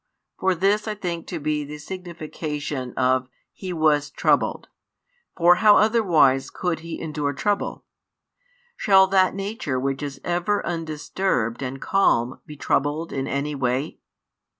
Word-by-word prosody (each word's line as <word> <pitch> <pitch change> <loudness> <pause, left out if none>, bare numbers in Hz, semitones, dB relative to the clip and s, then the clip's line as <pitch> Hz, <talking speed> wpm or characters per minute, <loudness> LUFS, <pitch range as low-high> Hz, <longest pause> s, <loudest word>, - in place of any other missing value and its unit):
For 190 -1 +2
this 200 +5 +1
I 215 - -2
think 175 -4 -4
to 170 - -4
be 150 0 -1
the 150 +1 -8
signification 150 -5 -6
of 130 0 +2 0.3
"He 185 -2 -6
was 155 -3 +2
troubled;" - - +1 0.7
for 175 0 +6
how 215 -1 +6
otherwise 170 - +3
could 175 -3 -2
He 165 0 -7
endure 150 -3 -2
trouble? 205 +8 -2 0.9
Shall 190 - +5
that 190 -1 +3
Nature 195 - -3
which 135 +1 -2
is 140 -2 -5
ever 175 +4 0
undisturbed 155 - -2
and 135 0 -4
calm 130 -11 +1
be 150 - -9
troubled 145 +4 -1
in 135 -1 -2
any 140 +2 -2
way? 135 +1 -2
155 Hz, 135 wpm, -23 LUFS, 140-185 Hz, 0.9 s, for